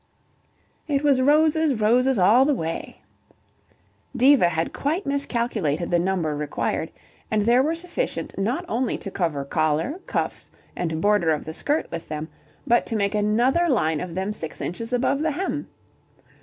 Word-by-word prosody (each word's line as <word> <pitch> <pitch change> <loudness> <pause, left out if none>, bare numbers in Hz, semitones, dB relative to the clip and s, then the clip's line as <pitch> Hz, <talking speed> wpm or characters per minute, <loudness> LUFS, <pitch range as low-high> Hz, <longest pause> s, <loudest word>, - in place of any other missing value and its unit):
"It 285 -2 0
was 275 -3 +3
roses, 305 +1 +3
roses 245 +4 +3
all 215 +8 +5
the 290 +1 +2
way." 165 -5 -5 1.2
Diva 255 -7 +5
had 165 0 -2
quite 320 +8 -2
miscalculated 235 - -1
the 175 - +3
number 175 -4 0
required, 150 0 -2 0.4
and 215 -1 +1
there 240 +4 +4
were 310 +4 0
sufficient 360 +8 -3
not 245 - -1
only 245 -2 -1
to 195 - -7
cover 160 -8 -2
collar, 155 - 0
cuffs - - -2 0.3
and 160 -2 -2
border 205 -5 +3
of 155 -2 0
the 160 - -6
skirt 295 - -1
with 165 -1 -6
them 155 +1 -5 0.4
but 240 -3 +2
to 225 - -2
make 200 -1 0
another 240 +11 +2
line 160 - +1
of 175 -2 -6
them 190 +3 -2
six 160 -7 -6
inches 230 +7 -5
above 250 +3 +1
the 315 +1 +1
hem. 355 +6 -3
220 Hz, 155 wpm, -24 LUFS, 170-280 Hz, 1.2 s, all